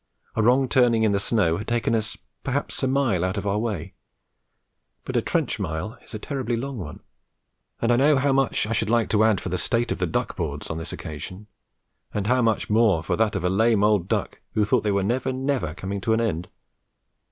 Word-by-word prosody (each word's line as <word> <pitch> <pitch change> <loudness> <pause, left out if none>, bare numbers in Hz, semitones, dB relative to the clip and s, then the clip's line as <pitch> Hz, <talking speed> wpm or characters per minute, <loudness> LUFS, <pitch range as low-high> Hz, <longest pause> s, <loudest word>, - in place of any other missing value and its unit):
A 115 - +2
wrong 125 +4 +4
turning 120 -4 +3
in 110 - +3
the 100 - +1
snow 100 -6 +1
had 105 - -6
taken 120 -1 0
us 110 -1 -1 0.3
perhaps 140 +1 -2
a 130 - +1
mile 130 -9 +1
out 95 +3 -1
of 100 - -3
our 100 +1 +1
way; 105 -8 -3 1.1
but - - -5
a - - +3
trench - - -1
mile 80 +9 -3
is - - -10
a - - -2
terribly 125 0 -3
long 135 0 -4
one, 90 - -7 0.8
and 115 - +1
I 120 - +4
know 145 +2 +4
how 135 +1 +2
much 135 -5 +1
I 110 - -2
should 110 -1 0
like 115 -1 +2
to 110 0 +4
add 110 -4 +3
for - - -5
the 90 0 -1
state 120 +4 0
of - - -2
the 90 - 0
duck 80 - -2
boards - - -4
on 80 - -3
this 80 - -5
occasion, 90 +6 -7 0.7
and 105 -2 -1
how 125 +3 +3
much 115 -2 +1
more 105 -7 +3
for - - 0
that 110 -1 +1
of 95 - -2
a 90 - +2
lame 110 +1 +3
old 105 -4 +3
duck - - -2
who 105 - +3
thought 105 - +2
they 105 - +1
were 100 -1 +1
never, 125 +5 0
never 130 - -1
coming 100 +2 -4
to 110 - +1
an 110 - +2
end! 90 -6 -1
110 Hz, 230 wpm, -24 LUFS, 100-120 Hz, 1.1 s, wrong